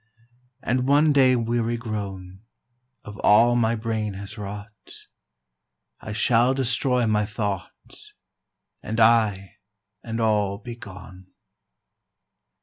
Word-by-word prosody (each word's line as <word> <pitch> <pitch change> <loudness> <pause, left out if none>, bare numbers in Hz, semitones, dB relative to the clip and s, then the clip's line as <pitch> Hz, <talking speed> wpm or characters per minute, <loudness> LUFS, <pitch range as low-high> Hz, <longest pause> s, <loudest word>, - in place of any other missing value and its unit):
And 125 +1 0
one 145 +2 +4
day 130 -2 +5
weary 120 0 -1
grown 100 -5 -6 0.6
Of 105 -1 -10
all 115 +4 +5
my 115 -1 +2
brain 110 -2 -3
has 100 +2 -8
wrought, 105 +1 -7 1.3
I 110 - -8
shall 120 +4 +2
destroy 125 -1 0
my 105 -1 +1
thought 105 -3 -3 1.1
And 110 +2 -4
I 105 -4 +2 0.5
and 115 0 -4
all 105 -3 +1
be 120 +2 -9
gone. 95 -4 -12
110 Hz, 105 wpm, -24 LUFS, 105-120 Hz, 1.3 s, day